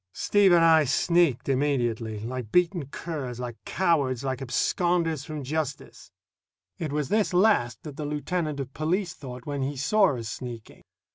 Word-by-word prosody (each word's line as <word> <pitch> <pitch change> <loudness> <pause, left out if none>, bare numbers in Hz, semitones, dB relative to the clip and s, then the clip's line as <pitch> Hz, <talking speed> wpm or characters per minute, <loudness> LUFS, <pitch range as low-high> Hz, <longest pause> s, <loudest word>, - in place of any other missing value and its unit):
Steve 205 -2 +3
and 170 -1 +6
I 160 -2 +6
sneaked 160 0 +2
immediately, 120 -6 0
like 120 -1 -5
beaten 175 -3 +2
curs, 140 -5 -5
like 120 -2 -7
cowards, 140 -9 +1
like 130 -2 -2
absconders 165 +3 0
from 155 -2 -6
justice. 140 -4 -4 0.7
It 155 -4 -3
was 150 -2 -2
this 210 -4 +1
last 175 - +3
that 150 -3 -8
the 150 - -4
lieutenant 150 +1 -2
of 135 -1 -5
police 175 +3 -1
thought 125 -5 -9
when 145 -2 -3
he 140 +1 -2
saw 150 +1 +3
us 115 -2 -5
sneaking. 115 -1 -8
145 Hz, 155 wpm, -26 LUFS, 125-170 Hz, 0.7 s, and